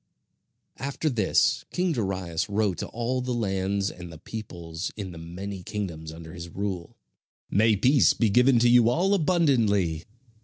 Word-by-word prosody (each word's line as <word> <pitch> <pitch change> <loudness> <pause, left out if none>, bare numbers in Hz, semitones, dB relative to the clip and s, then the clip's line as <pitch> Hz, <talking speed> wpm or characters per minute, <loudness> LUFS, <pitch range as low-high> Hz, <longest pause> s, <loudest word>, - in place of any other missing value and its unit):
After 140 +3 -2
this 110 -6 +2
king 180 0 0
Darius 95 - -2
wrote 100 -3 0
to - - -3
all 120 +2 -2
the 125 -1 -2
lands 100 -2 -1
and 90 -1 -10
the 80 - -10
peoples 85 -4 -6
in 100 -3 -5
the 85 - -9
many 95 +4 -7
kingdoms 85 -5 -5
under 80 0 -10
his 85 -1 -8
rule: 95 -2 -5 0.5
"May 110 +1 +4
peace 130 +7 +4
be 115 -4 +2
given 125 +3 +5
to 120 - +5
you 120 -1 +6
all 180 +10 +2
abundantly! 115 - +2
100 Hz, 155 wpm, -26 LUFS, 90-120 Hz, 0.5 s, you